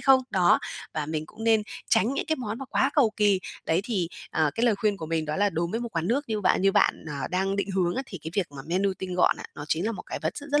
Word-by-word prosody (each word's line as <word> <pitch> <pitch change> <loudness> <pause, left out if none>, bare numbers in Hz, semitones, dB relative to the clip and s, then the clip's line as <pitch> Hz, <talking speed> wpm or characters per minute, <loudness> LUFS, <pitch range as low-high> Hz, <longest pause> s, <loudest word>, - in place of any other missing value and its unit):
không? 270 -1 +6
Đó, 180 -3 +4 0.4
và 155 -2 -2
mình 155 0 -3
cũng 225 +6 -9
nên 225 -2 +4 0.3
tránh 225 +2 +3
những - - -2
cái 315 -1 +1
món 225 -2 -4
mà 270 - -5
quá 270 - +2
cầu 255 -8 +5
kì. 205 -3 +3 0.3
Đấy, 165 +2 +2
thì, 190 -8 -1 0.2
à, 155 -2 +2
cái 235 +2 +2
lời 225 - +4
khuyên 205 0 0
của 160 - -6
mình 160 -1 -1
đó 150 0 -2
là 205 +1 +3
đối 165 0 -1
với 225 - -2
một 240 - -3
quán 165 +2 0
nước 280 +5 +1
như 215 -1 -1
bạn 185 -1 +2
như 195 0 +4
bạn, - - +2
à, 140 -1 -3
đang 190 +2 0
định 200 0 -1
hướng 180 -2 +1
á 265 - -1
thì 185 - -8
cái 160 - -5
việc 195 -4 +1
mà 135 -1 -8
menu 190 +4 +1
tinh 185 -1 -4
gọn 180 - +4
á, - - -9
nó 145 - -7
chính 170 +7 0
là 230 - 0
một - - -7
cái - - -4
vật - - -2
rất 285 - -7
rất 290 - +5
195 Hz, 305 wpm, -27 LUFS, 170-225 Hz, 0.4 s, không